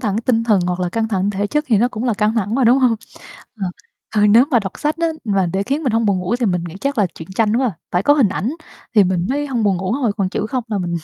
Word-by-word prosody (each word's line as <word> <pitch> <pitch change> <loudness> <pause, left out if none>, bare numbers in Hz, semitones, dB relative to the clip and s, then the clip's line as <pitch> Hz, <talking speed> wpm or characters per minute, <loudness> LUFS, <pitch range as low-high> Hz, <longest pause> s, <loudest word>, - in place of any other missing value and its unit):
thẳng 210 -6 -1
tinh 230 -2 +2
thần 215 -5 +3
hoặc 180 0 -2
là 180 - 0
căng 225 +4 -1
thẳng 195 -1 0
thể 205 0 -1
chất 300 +7 -1
thì 220 -5 +3
nó 240 - +3
cũng 225 -1 -5
là 240 -4 +1
căng 210 +2 +1
thẳng 215 -1 -1
mà, 260 -1 +2
đúng 245 +4 +5
hông? 250 -3 +3 0.7
Ờ, 185 -2 -1 0.4
ờ, 210 -1 +3
nếu 225 +5 +6
mà 250 - +4
đọc 195 -4 -4
sách 300 +1 -1
á 335 - +1 0.2
mà 195 -4 +1
để 195 +1 0
khiến 280 +8 -2
mình 255 -6 0
hông 225 -1 +1
buồn 195 -2 +2
ngủ 185 +6 -1
thì 245 -2 0
mình 180 -3 0
nghĩ 165 - -10
chắc 280 -3 -2
là 200 - +4
chuyện 160 - -10
tranh 225 0 +2
quá 260 - +2
à, - - -4 0.2
phải 180 - +1
có 290 - +5
hình 265 -9 +3
ảnh 210 +5 -2 0.4
thì 210 -3 +6
mình 180 -1 0
mới 290 +2 -1
hông 245 -5 -1
buồn 195 -3 +2
ngủ 185 +5 -2
thôi, 250 -6 0
còn 195 -3 0
chữ 210 +2 -3
không 255 -3 -2
là 210 -3 -1
mình 175 -2 -2
215 Hz, 310 wpm, -19 LUFS, 195-245 Hz, 0.7 s, nếu